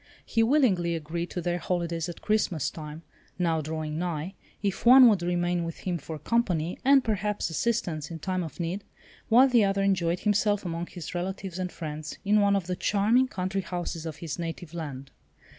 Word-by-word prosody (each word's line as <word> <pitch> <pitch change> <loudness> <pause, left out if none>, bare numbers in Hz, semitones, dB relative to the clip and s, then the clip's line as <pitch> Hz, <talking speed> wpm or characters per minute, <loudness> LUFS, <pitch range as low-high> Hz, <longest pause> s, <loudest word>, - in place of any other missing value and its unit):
He 225 - +1
willingly 225 - +3
agreed 165 +2 -4
to 180 - -4
their 175 +1 -1
holidays 170 -1 -2
at 170 - -9
Christmas 205 -8 +1
time, 155 0 -8 0.3
now 165 -3 +1
drawing 155 0 -4
nigh, 175 0 -3 0.3
if 200 -2 -1
one 255 +1 +9
would 205 -6 +4
remain 175 0 0
with 165 -1 -6
him 180 -2 -2
for 155 +2 -7
company, 175 - 0
and 270 0 +6
perhaps 210 -4 -1
assistance 170 -5 -1
in 165 - -6
time 185 +3 -2
of 160 -1 -7
need, 175 +4 -3 0.5
while 245 +4 +7
the 240 -4 +4
other 195 0 +1
enjoyed 180 -3 +1
himself 205 -1 +1
among 170 0 -3
his 175 -2 -8
relatives 185 0 -4
and 180 -1 -2
friends 155 -2 -6
in 210 +1 +4
one 200 0 +4
of 195 -3 -1
the 180 +1 -2
charming 215 +8 +2
country 190 -3 -2
houses 175 -2 -4
of 155 - -5
his 160 0 -6
native 170 0 -5
land. 140 -5 -6
175 Hz, 185 wpm, -27 LUFS, 165-200 Hz, 0.5 s, one